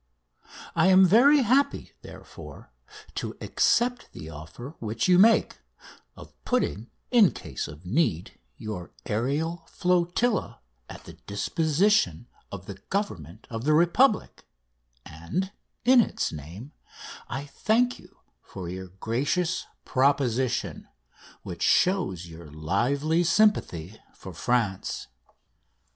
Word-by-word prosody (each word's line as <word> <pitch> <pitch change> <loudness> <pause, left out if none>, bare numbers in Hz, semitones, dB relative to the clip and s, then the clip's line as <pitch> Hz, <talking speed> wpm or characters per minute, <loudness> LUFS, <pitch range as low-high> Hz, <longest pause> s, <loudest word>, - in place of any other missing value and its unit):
I - - +4
am 190 0 +7
very 260 - +6
happy, 270 +5 +1
therefore, - - -12 0.4
to - - -5
accept 245 0 +1
the 80 +1 -9
offer 80 - -10
which 110 +1 -2
you 180 -1 +5
make, 225 +3 +4 0.6
of - - -13
putting, 125 - -1 0.2
in 230 -7 +6
case - - -6
of 75 +4 -12
need, 90 - -1 0.2
your 105 -5 -7
aerial 150 +10 -2
flotilla 180 +5 0 0.3
at - - -10
the - - -11
disposition 155 - 0 0.2
of 95 -2 -8
the 95 -1 -9
Government 105 - -4
of 115 0 -4
the 155 +2 +3
Republic, 185 - +2 0.6
and, 160 - -4 0.3
in 250 0 +7
its - - -2
name, 85 - -9 0.6
I 135 +4 -4
thank 235 +11 0
you - - -20 0.2
for 90 -2 -9
your 95 +2 -6
gracious 135 - -2 0.2
proposition, 130 -2 0 0.6
which - - -8
shows 175 - +2
your 85 -1 -11
lively 140 - 0
sympathy 165 - +1 0.2
for - - -10
France. 115 - -1
140 Hz, 110 wpm, -26 LUFS, -, 0.6 s, am